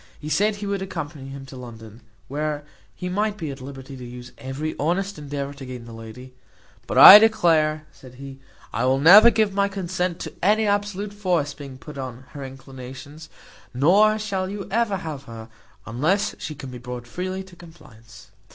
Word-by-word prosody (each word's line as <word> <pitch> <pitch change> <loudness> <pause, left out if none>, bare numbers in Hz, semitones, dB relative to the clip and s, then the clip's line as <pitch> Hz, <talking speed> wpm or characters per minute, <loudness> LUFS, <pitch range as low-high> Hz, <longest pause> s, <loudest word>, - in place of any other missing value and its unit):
He 150 - -7
said 205 +6 +2
he 205 0 -7
would 200 -1 -2
accompany 155 -7 -6
him 135 0 -9
to 135 - -12
London, 115 -2 -11 0.3
where 150 +1 -3 0.3
he 180 - -5
might 205 +3 -1
be 160 -7 -4
at 135 -1 -9
liberty 135 0 -9
to 125 - -10
use 125 0 -10
every 140 +4 -4
honest 180 +4 -1
endeavour 140 -1 -5
to 140 -1 -11
gain 125 -2 -8
the 115 - -11
lady: 115 +3 -11 0.5
"But - - -2
I 205 - +13
declare," 165 -9 +2
said 130 -1 -15
he, 135 0 -10 0.3
"I 115 - -1
will 130 +1 +3
never 195 +11 +9
give 215 -4 +1
my 200 0 +2
consent 185 -3 -3
to - - -6
any 215 +3 +3
absolute 205 0 -1
force 180 -8 -1
being 140 -3 -10
put 150 +1 -10
on 130 -1 -7
her 140 -2 -8
inclinations, 135 +3 -10 0.5
nor 200 +11 +4
shall 195 -3 -3
you 200 0 -6
ever 220 -2 +1
have 150 -5 -7
her, 115 -1 -10 0.4
unless 160 - 0
she 155 - -6
can 135 -2 -9
be 125 - -8
brought 125 0 -7
freely 185 +9 -5
to 190 -2 -16
compliance." 150 - -16
150 Hz, 185 wpm, -23 LUFS, 130-190 Hz, 0.5 s, I